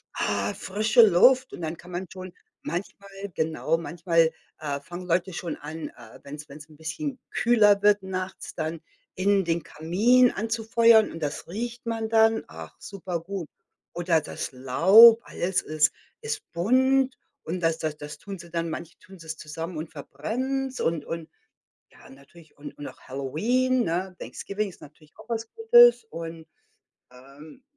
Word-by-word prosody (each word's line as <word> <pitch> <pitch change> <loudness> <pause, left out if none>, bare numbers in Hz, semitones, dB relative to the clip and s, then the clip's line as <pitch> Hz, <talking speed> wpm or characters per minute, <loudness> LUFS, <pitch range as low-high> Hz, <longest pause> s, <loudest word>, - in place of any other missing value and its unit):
ah, 100 0 -1
frische 215 +4 +2
Luft 250 +6 +5
und - - -8
dann 160 0 -4
kann 175 - -14
man 180 +2 -4
schon 185 -1 -9 0.3
manchmal 200 +3 -5 0.3
genau, 160 0 0
manchmal, 165 -1 +1 0.3
äh, 145 -2 -3
fangen 175 +5 -8
Leute 180 +2 0
schon 170 -1 -4
an, 155 +2 -7
äh, 110 -2 -15
wenn's 150 +1 -9
wenn's 150 +2 -11
'n 155 - -17
bisschen 255 - -5
kühler 210 -4 +4
wird 205 -1 +4
nachts 185 0 -6
dann 160 0 -4 0.4
innen 195 0 +2
den 165 -1 -1
Kamin 225 +13 +3
anzufeuern 225 +1 +3
und 165 - -9
das 150 -1 -4
riecht 235 +6 -5
man 225 -1 -2
dann. 225 0 +4
Ach, 80 0 -11
super 180 -4 -5
gut. 185 -1 -6 0.5
Oder 170 -1 +2
das 155 - -6
Laub, 190 - +7
alles 180 +1 -1
ist 155 -1 +2 0.3
ist 445 -2 -3
bunt 260 +8 +2 0.3
und 175 +3 -4
das 165 -1 +1
das 155 -2 -3
das 150 0 -8
tun 195 +4 -8
sie 170 0 -12
dann 165 0 -2
manche 165 +1 -7
tun 190 0 -15
sie's 160 -1 -7
zusammen 160 +2 -6
und 155 +1 -5
verbrennen's 255 - -4
und 160 -3 -1
und 165 -1 -6 0.6
ja, - - -17
natürlich, 140 +4 -18
und 145 -1 -10
und 145 - -7
auch - - -12
Halloween, 230 - 0
ne, 180 +3 -2
Thanksgiving 205 +1 -4
ist 185 - -16
natürlich 150 +1 -17
auch - - -15
was 225 -1 -3
Gutes 480 +1 +6
und, 165 - -7 0.7
ähm 140 - -15
175 Hz, 160 wpm, -26 LUFS, 155-220 Hz, 0.7 s, Laub